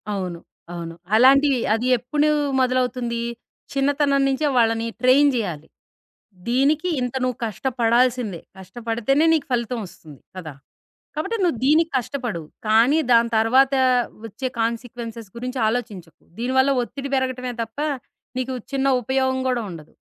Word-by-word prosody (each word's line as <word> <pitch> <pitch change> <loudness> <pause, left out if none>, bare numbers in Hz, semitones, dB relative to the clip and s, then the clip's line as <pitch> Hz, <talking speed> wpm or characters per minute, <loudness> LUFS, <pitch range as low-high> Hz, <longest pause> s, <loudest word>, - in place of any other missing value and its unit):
అవును. 185 -4 -4 0.3
అవును. 165 -1 -6 0.2
అలాంటివి 270 +3 +5
అది 230 +3 -1
ఎప్పుడూ 295 +6 0 0.3
మొదలవుతుంది. 250 -2 0 0.5
చిన్నతనం 280 0 +2
నుంచే 275 +3 0
వాళ్ళని 225 -1 +2
ట్రైన్ 265 +3 +5
జేయాలి. 175 -10 -3 0.8
దీనికి 290 +8 +2
ఇంత 250 0 -3
నువ్వు 255 -2 -1
కష్టపడాల్సిందే. 235 -2 0 0.2
కష్టపడితేనే 235 - -1
నీకు 310 -3 0
ఫలితం 240 0 -1
ఒస్తుంది. 155 -5 -15 0.2
కదా! 160 -5 -7 0.6
కాబట్టి 390 +10 -2
నువ్వు 335 -9 +1
దీనికి 315 +4 +4
కష్టపడు. 245 - -3 0.3
కానీ 230 +8 +4
దాని 235 0 +5
తర్వాత 260 +5 +4 0.5
వచ్చే 235 +5 -5
కాన్సీక్వెన్సెస్ 230 -1 -4
గురించి 250 +2 -4
ఆలోచించకు. 215 -8 -4 0.2
దీనివల్ల 260 +3 +2
ఒత్తిడి 275 +3 -7
పెరగటమే 255 -1 -2
తప్ప, 225 +4 -11 0.6
నీకు 255 0 -3 0.2
చిన్న 275 0 +1
ఉపయోగం 260 +2 0
గూడా 250 -2 0
ఉండదు. 160 -3 -11
245 Hz, 120 wpm, -22 LUFS, 225-270 Hz, 0.8 s, అలాంటివి